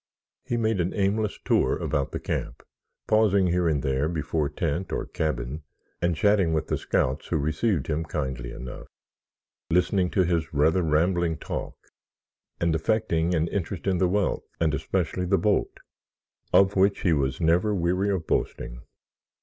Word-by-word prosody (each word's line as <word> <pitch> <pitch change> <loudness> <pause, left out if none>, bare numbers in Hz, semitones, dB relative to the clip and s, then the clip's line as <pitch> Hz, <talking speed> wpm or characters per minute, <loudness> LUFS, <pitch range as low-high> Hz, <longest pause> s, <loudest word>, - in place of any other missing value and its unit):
He 120 - -2
made 110 -4 +1
an 85 - -2
aimless 105 +1 0
tour - - +2
about 70 -2 -1
the - - -3
camp, - - -4 0.4
pausing 105 -3 +3
here 90 0 +1
and 75 -5 +1
there 70 +3 0
before 80 -2 -1
tent 85 +3 -2
or - - -2
cabin 70 -1 -3 0.4
and 85 -1 +1
chatting 100 -2 +3
with 80 -1 -1
the - - +1
scouts 65 +4 -1
who 85 - 0
received 80 - 0
him 80 +1 -1
kindly 65 -6 -4
enough, 65 +1 -8 0.8
listening 90 +1 +2
to 95 - +2
his 85 -3 -1
rather 80 +5 +3
rambling 85 +1 +1
talk - - -5 0.8
and 85 -1 +1
affecting 85 -1 +1
an 80 0 +1
interest 95 -2 -3
in 95 -2 +1
the 90 - +3
wealth 100 +1 0
and 80 -2 +2
especially 90 +4 -1
the 95 +2 +2
boat, 100 +4 0 0.7
of 100 +1 +5
which 100 +1 +3
he 85 - +3
was 70 -3 0
never 90 +6 +2
weary 90 +3 +1
of 95 -5 -1
boasting. - - -2
85 Hz, 160 wpm, -26 LUFS, 75-95 Hz, 0.8 s, of